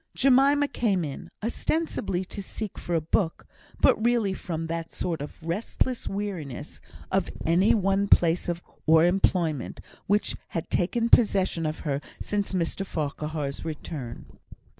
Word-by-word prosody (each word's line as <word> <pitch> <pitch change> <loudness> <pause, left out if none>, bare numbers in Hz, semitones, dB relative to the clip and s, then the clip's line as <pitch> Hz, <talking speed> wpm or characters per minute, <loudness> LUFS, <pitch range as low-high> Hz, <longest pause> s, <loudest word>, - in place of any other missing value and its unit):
Jemima 275 +2 +5
came 200 - 0
in, 140 -2 -7
ostensibly 225 - -1
to 200 - -6
seek 210 +1 -6
for 175 - -2
a 165 - +2
book, 165 +2 0 0.3
but 220 - +4
really 235 -5 +2
from 165 -3 -4
that 165 0 -4
sort 165 -4 -3
of 150 +3 -8
restless 230 +7 -1
weariness 185 -9 -5 0.3
of 190 -2 +1 0.2
any 175 +7 +4
one 195 -1 +2
place 170 -2 +4 0.4
or 160 +1 +7
employment, 175 -5 +1 0.3
which 205 +2 +2 0.2
had 165 - -4
taken 230 +6 +1
possession 190 -8 +4
of 155 - -4
her 140 -2 -1 0.2
since 205 -1 -1
Mr 185 +1 -1
Farquhar's 150 -3 -3
return. 150 -6 -6
180 Hz, 135 wpm, -27 LUFS, 160-205 Hz, 0.4 s, or